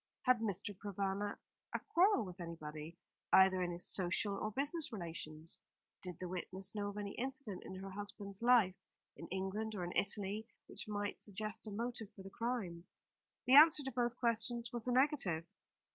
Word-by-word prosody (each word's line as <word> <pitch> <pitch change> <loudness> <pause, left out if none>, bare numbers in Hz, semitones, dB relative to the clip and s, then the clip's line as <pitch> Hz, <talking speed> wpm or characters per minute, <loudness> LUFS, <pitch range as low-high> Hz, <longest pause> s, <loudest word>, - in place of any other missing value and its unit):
Had 250 -2 +5
Mr. 205 -1 -2
Provana 200 +1 -2 0.4
a - - +1
quarrel 355 - +5
with 180 0 -8
anybody, 160 -1 -7 0.3
either 190 -1 +7
in 180 - 0
his 175 0 0
social 190 +2 +2
or 215 - -2
business 290 - -1
relations? 165 -5 -7 0.4
Did 180 -3 -5
the 185 - -5
witness 185 +1 -4
know 205 -1 -2
of 205 - -7
any 205 -1 -3
incident 260 -6 -4
in 190 - -7
her 195 +1 -6
husband's 205 0 -6
life 235 -6 +6 0.4
in 165 - -8
England 195 +4 -2
or 185 - -2
in 175 - -4
Italy 205 +2 +1 0.2
which - - -6
might 205 -1 -3
suggest 210 +1 -4
a - - -4
motive 230 0 -3
for 195 - -10
the 195 - -9
crime? 205 -9 -3 0.6
The 255 - +4
answer 300 +1 +9
to 265 - -3
both 240 0 0
questions 235 0 0
was 240 0 -4
a - - +2
negative. 245 - +3
205 Hz, 175 wpm, -37 LUFS, 185-235 Hz, 0.6 s, answer